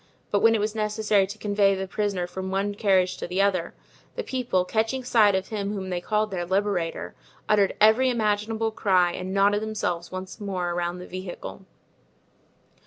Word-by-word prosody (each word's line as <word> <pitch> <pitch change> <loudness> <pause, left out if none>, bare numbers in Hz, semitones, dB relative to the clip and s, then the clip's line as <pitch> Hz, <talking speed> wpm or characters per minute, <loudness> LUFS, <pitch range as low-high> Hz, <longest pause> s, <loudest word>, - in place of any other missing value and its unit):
But 205 - +3
when 225 +1 +5
it - - +1
was 210 +1 -1
necessary 210 -2 +1
to 200 +2 -8
convey 200 -2 +2
the 190 0 -4
prisoner 195 -1 -1
from 190 +1 -6
one 195 +2 -1
carriage 190 -3 +2
to - - -5
the 180 +2 -2
other, 185 -4 0 0.4
the 480 - -3
people, 245 - -1
catching 225 +6 -1
sight 215 -5 +4
of 190 0 -2
him 205 -2 -3
whom 190 -2 -5
they 175 -1 -2
called 215 +2 0
their 180 -2 -2
liberator, 190 -2 -1 0.3
uttered 205 -2 +3
every 220 +5 +5
imaginable 220 -1 0
cry 185 -5 +2
and 185 +2 -5
knotted 200 +1 +3
themselves 195 -6 -3
once 185 +3 -7
more 185 -3 -2
around 175 0 -2
the 180 - -8
vehicle. 185 +1 -8
200 Hz, 175 wpm, -25 LUFS, 185-215 Hz, 0.4 s, when